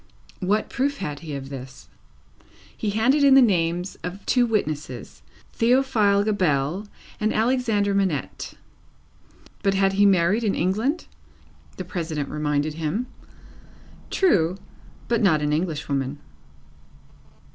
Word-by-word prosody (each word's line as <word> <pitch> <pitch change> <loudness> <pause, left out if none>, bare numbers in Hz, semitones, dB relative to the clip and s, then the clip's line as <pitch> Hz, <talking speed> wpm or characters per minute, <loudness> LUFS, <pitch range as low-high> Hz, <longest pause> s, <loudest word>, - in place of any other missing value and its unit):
What 205 +3 0
proof 280 +2 0
had 150 -6 -4
he 150 -2 -6
of 135 -1 -7
this? 135 -1 -9 0.9
He 215 - -2
handed 245 +8 +2
in 275 -1 +7
the - - +9
names 180 -5 +1
of 180 +3 -6
two 245 -1 +3
witnesses; 150 - -3 0.3
Theophile 230 -5 +3
Gabelle, 185 -2 0 0.3
and 215 +1 +1
Alexandre 220 -3 +1
Manette. 190 -8 -2 1.1
But 195 -1 +1
he - - 0
had 195 0 +3
married 200 +1 +3
in 205 -3 +1
England? 220 - 0 0.7
the 185 - -5
President 160 -5 -3
reminded 150 0 -1
him. 165 +9 -2 1.0
True, 185 - +2 0.5
but 235 -1 +1
not 170 -7 +4
an 150 0 +1
English 160 -1 -2
woman. 140 0 -2
190 Hz, 120 wpm, -24 LUFS, 155-220 Hz, 1.1 s, the